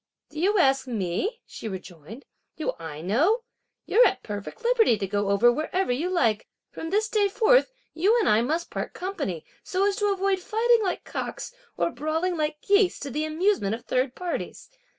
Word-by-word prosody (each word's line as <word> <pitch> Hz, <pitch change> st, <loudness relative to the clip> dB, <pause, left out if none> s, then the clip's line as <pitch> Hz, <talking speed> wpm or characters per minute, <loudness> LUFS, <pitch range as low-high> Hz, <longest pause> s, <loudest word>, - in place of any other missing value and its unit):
"Do 305 Hz, -, -7 dB
you 400 Hz, +5 st, +2 dB
ask 270 Hz, -6 st, +3 dB
me?" 230 Hz, -, -2 dB
she -, -, -8 dB
rejoined; 190 Hz, -, -9 dB, 0.3 s
"do 310 Hz, -, -2 dB
I 155 Hz, -2 st, -7 dB
know? 310 Hz, -, +2 dB, 0.4 s
you're 480 Hz, -, +5 dB
at -, -, -3 dB
perfect 205 Hz, -, -7 dB
liberty 465 Hz, -, +4 dB
to 195 Hz, -, -2 dB
go 205 Hz, +1 st, -1 dB
over 205 Hz, +5 st, +5 dB
wherever 310 Hz, +5 st, -1 dB
you 300 Hz, +9 st, -1 dB
like; 235 Hz, -, +1 dB, 0.2 s
from 325 Hz, -, -6 dB
this 425 Hz, +4 st, +1 dB
day 425 Hz, -2 st, +2 dB
forth -, -, +3 dB, 0.2 s
you 395 Hz, +9 st, +3 dB
and 430 Hz, -, +1 dB
I 215 Hz, +2 st, +4 dB
must 320 Hz, +8 st, -2 dB
part -, -, -4 dB
company 355 Hz, -, -4 dB, 0.2 s
so 380 Hz, +1 st, 0 dB
as 405 Hz, 0 st, +1 dB
to 415 Hz, -2 st, +1 dB
avoid 390 Hz, 0 st, +1 dB
fighting 455 Hz, +4 st, +2 dB
like 375 Hz, -4 st, -2 dB
cocks -, -, -5 dB, 0.2 s
or -, -, +1 dB
brawling 320 Hz, +6 st, -1 dB
like 300 Hz, -1 st, -2 dB
geese, 405 Hz, -2 st, +3 dB
to 280 Hz, -, -5 dB
the 300 Hz, +4 st, -1 dB
amusement 310 Hz, -, +1 dB
of 235 Hz, -, -12 dB
third 255 Hz, 0 st, 0 dB
parties. 360 Hz, +6 st, -5 dB
320 Hz, 185 wpm, -26 LUFS, -, 0.4 s, you're